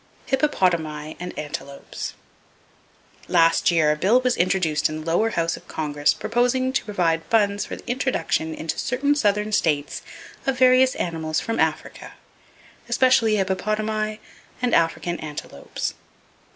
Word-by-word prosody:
Hippopotami 170 - 0
And 180 0 -5
Antelopes. 145 -2 -6 1.1
—Last 165 0 +4
year 160 -3 +3
a - - +1
bill 205 +11 +3
was 255 -1 +1
introduced 175 -5 +1
in 155 0 -5
the 155 - -9
lower 175 +7 +2
House 170 -5 -1
of - - -14
Congress 145 -2 0
proposing 250 +3 0
to 265 - 0
provide 170 -6 0
funds 205 -2 +1
for - - -5
the - - -14
introduction 245 - -1
into 160 - -4
certain 280 +4 +1
southern 210 -5 +1
states 150 -8 0 0.5
of 265 -1 +1
various 255 0 +5
animals 160 -2 -2
from 225 +5 -3
Africa, - - -2 0.8
especially 235 -4 +4
hippopotami 215 +2 -1 0.4
and 250 -1 0
African 170 +1 +1
antelopes. 150 - -5
190 Hz, 130 wpm, -23 LUFS, 160-235 Hz, 1.1 s, various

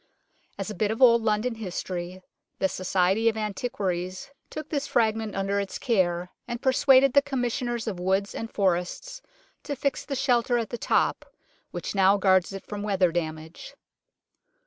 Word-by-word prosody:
As - - -4
a - - -5
bit 205 +2 0
of 220 - -2
old 235 -3 +6
London 220 +2 0
history, 185 -3 -5 0.3
the 190 - +2
Society 190 +4 +1
of 220 - -4
Antiquaries 190 -3 -3 0.2
took 310 -1 -6
this 290 -2 -2
fragment 220 -2 0
under 195 +1 0
its 200 -1 -4
care, 180 -7 0 0.2
and 240 -1 -4
persuaded 265 0 +4
the 280 - +6
Commissioners 245 -3 -2
of 195 -5 -4
Woods 190 +2 0
and 225 - -5
Forests 195 - -1 0.4
to 285 - -4
fix 280 0 -1
the 280 - -4
shelter 245 -2 +2
at 230 -2 -3
the 240 - -3
top - - 0 0.4
which - - -5
now 195 0 +4
guards 190 -2 +3
it 195 0 -8
from 205 -1 -6
weather 195 -4 +2
damage. 160 -1 -5
210 Hz, 160 wpm, -26 LUFS, 185-240 Hz, 0.4 s, old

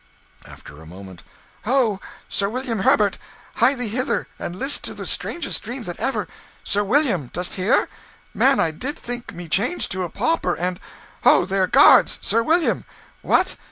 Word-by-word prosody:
After 75 - -13
a 80 - -13
moment 95 +1 -11 0.4
"Ho, 235 -5 +2 0.3
Sir 200 0 0
William 245 -1 -3
Herbert! 200 +1 +2 0.4
Hie 250 +5 +4
thee 245 -3 -3
hither, 250 +5 -1
and 175 - -5
list 270 +9 0
to - - -7
the - - -7
strangest 340 - -3
dream 245 +3 -6
that 175 -4 -7
ever... 270 - -1 0.4
Sir 205 +1 0
William! 205 - +1
dost 180 +1 -2
hear? 195 +6 +2 0.5
Man, 270 0 +3
I 165 - +2
did 260 - -5
think 245 0 -6
me 175 -1 -9
changed 220 - -1
to 185 - -2
a 175 - -4
pauper, 330 - -1
and... 180 +1 -2 0.4
Ho - - +5
there! 190 -1 +1
Guards! - - +6
Sir 230 - +1
William! 325 +7 +1 0.4
What! - - +1
215 Hz, 165 wpm, -22 LUFS, 180-260 Hz, 0.5 s, Guards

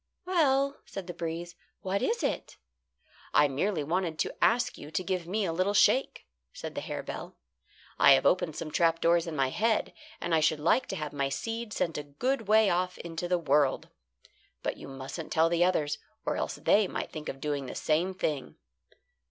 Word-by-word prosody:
"Well," 280 -6 +2
said 195 -2 -6
the 175 - -6
breeze, 170 +1 -5 0.3
"what 195 +1 -1
is 470 +1 0
it?" - - -2 0.8
"I 150 - +6
merely 155 +4 -1
wanted 165 +1 -1
to - - -1
ask 245 +1 +3
you 145 - -10
to 170 +4 -2
give 180 -2 -2
me 205 +3 0
a 165 - -1
little 185 +4 +1
shake," 260 +5 +3 0.3
said - - -7
the - - -4
harebell. - - -6 0.6
"I 140 - +8
have 135 - +3
opened 175 -4 +2
some 155 - -5
trap 165 0 +2
doors 170 0 +3
in 165 - -4
my 135 -2 +2
head, 220 - 0 0.3
and 170 - -2
I 160 - +5
should 155 0 +2
like 175 - +2
to - - -4
have 150 -4 -4
my 140 -1 0
seed 225 +10 -4
sent 165 -7 -1
a - - -5
good 225 - -2
way 215 0 +5
off 180 0 0
into 170 +1 -5
the 180 0 +2
world. 145 -4 +1 0.7
But - - -1
you - - -10
mustn't 135 +4 -7
tell 165 +1 +4
the 170 0 +3
others, 150 -5 +1 0.3
or - - 0
else - - -2
they 205 -1 +3
might - - -4
think 155 -1 -6
of 135 - -6
doing 145 -2 -2
the - - -7
same 175 +5 0
thing." 150 -6 -2
170 Hz, 195 wpm, -29 LUFS, 150-200 Hz, 0.8 s, I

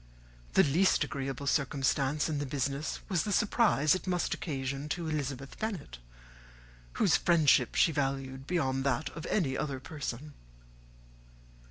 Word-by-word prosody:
The - - +6
least 170 +7 +3
agreeable 135 0 -4
circumstance 140 0 +1
in 150 -2 -2
the 145 - -3
business 140 +2 -2
was 185 -6 +1
the 210 - -3
surprise 205 - +3
it 185 - -3
must 180 -1 0
occasion 140 -1 -4
to 165 +2 -3
Elizabeth 140 -3 -4
Bennet, 200 - -4 0.9
whose - - +3
friendship 150 -7 +3
she 165 - +4
valued 135 -2 -3
beyond 135 -7 0
that 140 +1 0
of 165 0 -7
any 150 -11 0
other 140 -2 -3
person. 145 0 -6
145 Hz, 135 wpm, -30 LUFS, 135-160 Hz, 0.9 s, The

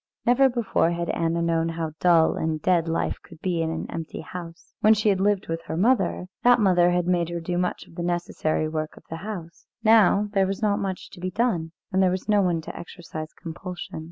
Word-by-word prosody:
Never 265 +3 +5
before 235 -8 +1
had 170 0 -2
Anna 170 0 0
known 165 0 +1
how 165 -1 -3
dull 170 -3 +5
and 160 -1 -1
dead 170 0 +2
life 165 0 -1
could 165 -3 -15
be 175 -2 -1
in 160 - 0
an 160 0 -3
empty 165 -1 -5
house. 170 0 -9
When 215 +1 +6
she 215 0 +2
had 195 -2 +2
lived 205 -1 +1
with 165 0 -3
her 160 - -4
mother, 225 -2 +2 0.2
that 245 0 +5
mother 180 -4 +4
had 175 0 +1
made 175 -2 +1
her 170 0 -3
do 175 +1 -3
much 180 0 -2
of - - -18
the 170 - -5
necessary 170 -3 -1
work 155 0 -4
of - - -14
the 165 - -3
house; 175 -3 -8 0.2
now 215 -2 +5
there 195 -2 +3
was 195 0 -3
not 210 -2 +1
much 190 -2 -4
to 180 - -12
be 185 +1 -2
done, 185 -6 0 0.2
and 190 0 +2
there 185 - +4
was 185 +2 -3
no 210 -1 +4
one 175 -3 +1
to - - -8
exercise 160 -3 -8
compulsion. 175 0 -6
175 Hz, 225 wpm, -25 LUFS, 165-195 Hz, 0.2 s, When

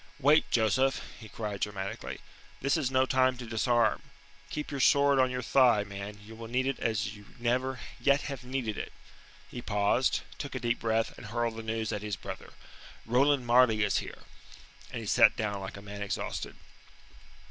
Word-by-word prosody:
"Wait, 150 +3 +4
Joseph!" 125 +4 +2 0.2
he 110 -2 -11
cried 105 -2 -5
dramatically. 100 -1 -4 0.4
"This 140 +1 +1
is 150 -6 0
no 130 0 +3
time 130 -1 +2
to 125 - -7
disarm. 115 -1 +2 0.5
Keep 150 - -4
your 140 - -3
sword 140 +1 +5
on 130 -1 +4
your 125 0 -3
thigh, 120 -4 +4
man; 100 +1 -7
you 110 - -11
will 115 0 -8
need 125 +3 0
it 135 0 -1
as 105 -2 -1
you 105 -1 -14
never 125 +2 0 0.2
yet 140 0 +3
have 135 -3 -6
needed 125 -4 -3
it." - - -5 0.6
He 120 - -6
paused, 105 +4 +1 0.2
took 140 -2 -5
a - - -2
deep 120 -1 0
breath, 115 0 0
and 110 - -9
hurled 115 +1 -1
the 115 - -5
news 110 -1 -2
at 105 - -3
his 105 -2 -3
brother. - - -8 0.5
"Roland 130 +3 +3
Marleigh 120 -3 +5
is 100 - +1
here." - - -8 0.7
And - - -5
he - - -7
sat - - +6
down 100 -2 -2
like 95 +1 -6
a 100 - -10
man 100 0 -8
exhausted. 100 - -3
120 Hz, 185 wpm, -30 LUFS, 105-130 Hz, 0.7 s, sat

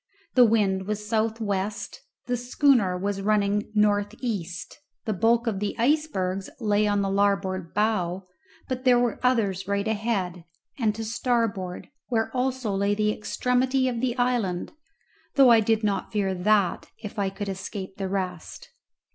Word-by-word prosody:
The 250 -1 +7
wind 200 -4 +1
was 210 0 -3
south 220 0 0
west, 205 -1 -3 0.2
the 245 - 0
schooner 245 -6 +2
was 195 +1 -2
running 205 0 +1
north 205 0 +2
east; 180 -8 -4 0.3
the 220 - 0
bulk 230 +4 +2
of 215 -5 -1
the 205 0 -2
icebergs 230 -9 0
lay 210 -2 +2
on 205 -1 +1
the 195 - -1
larboard 195 -3 0
bow, 195 -4 0 0.4
but 255 -1 -3
there 250 -2 +5
were 240 -2 0
others 205 -7 +1
right 200 +1 0
ahead, 205 -5 -1 0.4
and 215 -3 +1
to 225 0 -4
starboard, 225 -5 -1 0.2
where 225 0 -1
also 250 -4 -1
lay 200 +1 +1
the 210 0 +1
extremity 255 +4 0
of 240 -2 -2
the 255 -1 -1
island, 240 -8 0 0.6
though 270 -4 +7
I 230 - +7
did 220 0 +1
not 205 -2 -1
fear 200 -3 0
that 190 0 +1
if 210 0 -6
I 195 -1 +1
could 195 +1 -6
escape 190 0 -6
the 195 -1 -3
rest. 185 -3 -4
210 Hz, 155 wpm, -26 LUFS, 195-235 Hz, 0.6 s, The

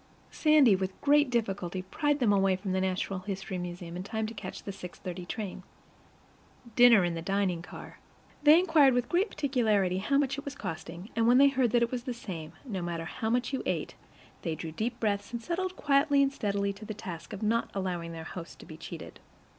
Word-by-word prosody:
Sandy 300 -9 +5
with 190 0 -4
great 290 -1 +4
difficulty 195 -6 -2
pried 290 +9 0
them 235 -7 +3
away 195 -1 +3
from 190 +1 -4
the 190 0 +1
Natural 190 0 -1
History 190 -1 -5
Museum 175 -1 -6
in 180 - -4
time 220 +3 -3
to 220 - -5
catch 210 - -7
the 200 - -5
6:15 180 -1 -8
train. 195 -2 -5 1.1
Dinner 240 -5 +7
in 175 -1 0
the 165 - -4
dining 190 -1 0
car. - - -11 0.4
They 300 +2 +8
inquired 310 -8 +5
with 245 -1 +1
great 380 +5 +2
particularity 215 -10 +1
how 275 +8 +1
much 280 -1 +1
it - - -8
was 280 -1 -6
costing, 175 -1 -7
and 230 0 +2
when 245 +1 +6
they 280 +1 +7
heard 260 -3 +2
that 240 -1 +4
it 235 - -1
was 250 -1 -4
the 250 - -3
same, 170 -8 -7
no 200 -8 -4
matter 170 -1 -3
how 220 +7 -3
much 245 +3 0
you 265 - -1
ate, - - -2 0.5
they 165 -2 -2
drew 160 0 -6
deep 235 +8 -3
breaths 205 -1 -1
and 235 -1 -4
settled 370 +4 -2
quietly 280 0 +3
and 275 0 0
steadily 200 -4 -1
to 200 +2 -12
the 215 0 -6
task 175 -6 -8
of 200 - -6
not 230 +2 +1
allowing 180 -3 -3
their 165 -1 -7
host 165 +1 -8
to - - -13
be 155 - -10
cheated. 165 0 -9
205 Hz, 210 wpm, -29 LUFS, 185-255 Hz, 1.1 s, They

